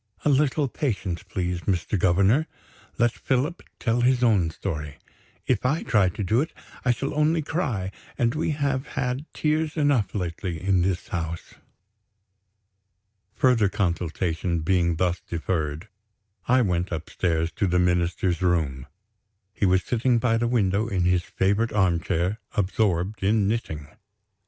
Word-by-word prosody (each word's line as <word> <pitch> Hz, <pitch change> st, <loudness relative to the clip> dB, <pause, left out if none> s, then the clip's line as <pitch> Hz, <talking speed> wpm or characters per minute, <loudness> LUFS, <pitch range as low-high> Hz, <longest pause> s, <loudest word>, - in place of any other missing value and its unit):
"A -, -, +4 dB
little 145 Hz, +1 st, +2 dB
patience, 105 Hz, -, -2 dB
please, 90 Hz, -2 st, -3 dB
Mr. 95 Hz, +1 st, -1 dB
Governor; 100 Hz, -, +3 dB, 0.5 s
let 120 Hz, 0 st, +3 dB
Philip 135 Hz, +9 st, -1 dB, 0.2 s
tell 120 Hz, 0 st, +1 dB
his 125 Hz, 0 st, +3 dB
own 100 Hz, -8 st, +3 dB
story. 75 Hz, -4 st, -5 dB, 0.5 s
If 125 Hz, -5 st, +1 dB
I 145 Hz, +6 st, +1 dB
try 100 Hz, -5 st, +3 dB
to 100 Hz, -, -4 dB
do 110 Hz, +7 st, +2 dB
it, 160 Hz, -, -4 dB, 0.3 s
I 125 Hz, -, 0 dB
shall 125 Hz, +3 st, 0 dB
only 155 Hz, +2 st, +2 dB
cry 120 Hz, -, -2 dB, 0.3 s
and 120 Hz, -1 st, +2 dB
we 155 Hz, +2 st, -1 dB
have 140 Hz, -3 st, -1 dB
had 130 Hz, +3 st, -2 dB
tears 155 Hz, +1 st, 0 dB
enough 145 Hz, -10 st, +2 dB
lately, 85 Hz, -2 st, -3 dB
in 95 Hz, +1 st, +2 dB
this 95 Hz, +3 st, -1 dB
house." 85 Hz, -5 st, -4 dB, 1.8 s
Further 120 Hz, -6 st, +3 dB
consultation 85 Hz, -2 st, -1 dB
being 85 Hz, 0 st, +2 dB
thus 90 Hz, +1 st, 0 dB
deferred, 80 Hz, 0 st, -3 dB, 0.6 s
I 125 Hz, +1 st, +4 dB
went 90 Hz, -2 st, -1 dB
upstairs 80 Hz, 0 st, -1 dB
to 100 Hz, -, +2 dB
the 90 Hz, 0 st, +1 dB
Minister's 90 Hz, 0 st, +1 dB
room. 80 Hz, -8 st, 0 dB, 0.7 s
He 100 Hz, -, +1 dB
was 90 Hz, 0 st, +3 dB
sitting 120 Hz, +3 st, +1 dB
by 115 Hz, -1 st, +2 dB
the 120 Hz, +1 st, +1 dB
window, 105 Hz, -2 st, +1 dB
in 95 Hz, -5 st, 0 dB
his 90 Hz, 0 st, +3 dB
favorite 100 Hz, +6 st, 0 dB
armchair, 90 Hz, 0 st, +1 dB, 0.2 s
absorbed 100 Hz, -1 st, 0 dB
in 100 Hz, +1 st, +2 dB
knitting! 90 Hz, -9 st, -2 dB
100 Hz, 140 wpm, -25 LUFS, 85-125 Hz, 1.8 s, A